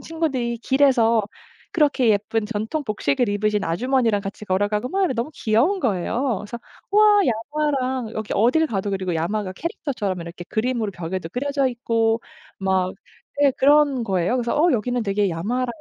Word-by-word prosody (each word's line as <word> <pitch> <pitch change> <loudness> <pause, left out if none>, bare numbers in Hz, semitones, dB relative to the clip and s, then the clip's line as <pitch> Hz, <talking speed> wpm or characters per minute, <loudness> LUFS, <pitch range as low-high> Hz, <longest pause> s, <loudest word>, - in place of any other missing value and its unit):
친구들이 270 -8 -2
길에서 240 -4 +3 0.5
그렇게 285 -6 +2
예쁜 210 +1 0
전통 225 +7 -3
복식을 245 +2 0
입으신 205 0 0
아주머니랑 230 +4 +1
같이 200 +1 -7
걸어가고 205 +5 0
막 390 +6 0
이런 330 - 0
너무 235 +6 -2
귀여운 255 - +1
거예요. 230 - 0
그래서 210 +3 -7 0.3
'우와 420 0 +6
야마랑' 260 0 -1
여기 215 -1 -4
어딜 250 +10 +3
가도 200 -6 -2
그리고 190 -3 -2
야마가 185 +4 -2
캐릭터처럼 210 - -3
이렇게 170 +1 -9
그림으로 225 -1 -1
벽에도 175 0 -5
그려져 275 - -1
있고 230 -2 0 0.4
막 190 -1 +1 0.5
예 285 -2 +5
그런 285 -2 +4
거예요. 190 -1 0
그래서 240 -2 -1
어 345 +1 +4
여기는 245 +1 0
되게 200 0 +1
야마랑 210 +10 -2
230 Hz, 385 characters per minute, -22 LUFS, 205-265 Hz, 0.5 s, 우와